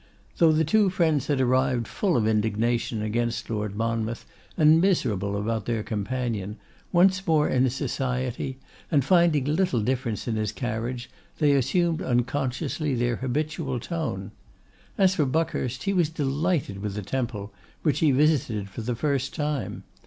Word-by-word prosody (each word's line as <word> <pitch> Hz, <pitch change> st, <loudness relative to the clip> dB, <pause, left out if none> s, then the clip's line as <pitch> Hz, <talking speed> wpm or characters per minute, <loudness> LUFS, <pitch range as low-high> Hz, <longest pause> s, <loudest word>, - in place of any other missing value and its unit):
Though 165 Hz, -2 st, +6 dB
the 155 Hz, +1 st, +2 dB
two 205 Hz, +5 st, +3 dB
friends 160 Hz, -7 st, +1 dB
had 145 Hz, -3 st, +1 dB
arrived 130 Hz, -2 st, +2 dB
full 190 Hz, -5 st, 0 dB
of 110 Hz, -, +1 dB
indignation 110 Hz, +1 st, 0 dB
against 115 Hz, +2 st, -2 dB
Lord 105 Hz, -2 st, -2 dB
Monmouth, 115 Hz, +1 st, -2 dB, 0.3 s
and 160 Hz, 0 st, +6 dB
miserable 105 Hz, -, +1 dB
about 110 Hz, 0 st, -2 dB
their 115 Hz, -3 st, -1 dB
companion, 110 Hz, -2 st, -3 dB, 0.3 s
once 185 Hz, +1 st, +3 dB
more 155 Hz, -2 st, +3 dB
in 130 Hz, 0 st, +2 dB
his 130 Hz, 0 st, -1 dB
society, 130 Hz, -1 st, -2 dB, 0.3 s
and 140 Hz, -5 st, +2 dB
finding 170 Hz, -6 st, +4 dB
little 155 Hz, -3 st, +1 dB
difference 120 Hz, -2 st, -2 dB
in 115 Hz, -2 st, -1 dB
his 110 Hz, -1 st, -1 dB
carriage, 120 Hz, +1 st, -4 dB, 0.3 s
they 150 Hz, -2 st, +3 dB
assumed 160 Hz, +5 st, +1 dB
unconsciously 135 Hz, +3 st, -1 dB
their 120 Hz, 0 st, 0 dB
habitual 135 Hz, 0 st, -2 dB
tone. 125 Hz, -, -4 dB, 0.7 s
As 190 Hz, -1 st, +4 dB
for 155 Hz, -5 st, +1 dB
Buckhurst, 130 Hz, -4 st, -1 dB
he 195 Hz, -, 0 dB
was 175 Hz, -5 st, +2 dB
delighted 150 Hz, -, -1 dB
with 100 Hz, -1 st, -4 dB
the 105 Hz, -, -4 dB
Temple, 105 Hz, -2 st, -3 dB, 0.3 s
which 150 Hz, -, +2 dB
he 160 Hz, -, +4 dB
visited 130 Hz, -8 st, +2 dB
for 115 Hz, -, -6 dB
the 120 Hz, +2 st, -2 dB
first 140 Hz, +1 st, -1 dB
time. 150 Hz, -3 st, -3 dB
130 Hz, 150 wpm, -26 LUFS, 115-155 Hz, 0.7 s, Though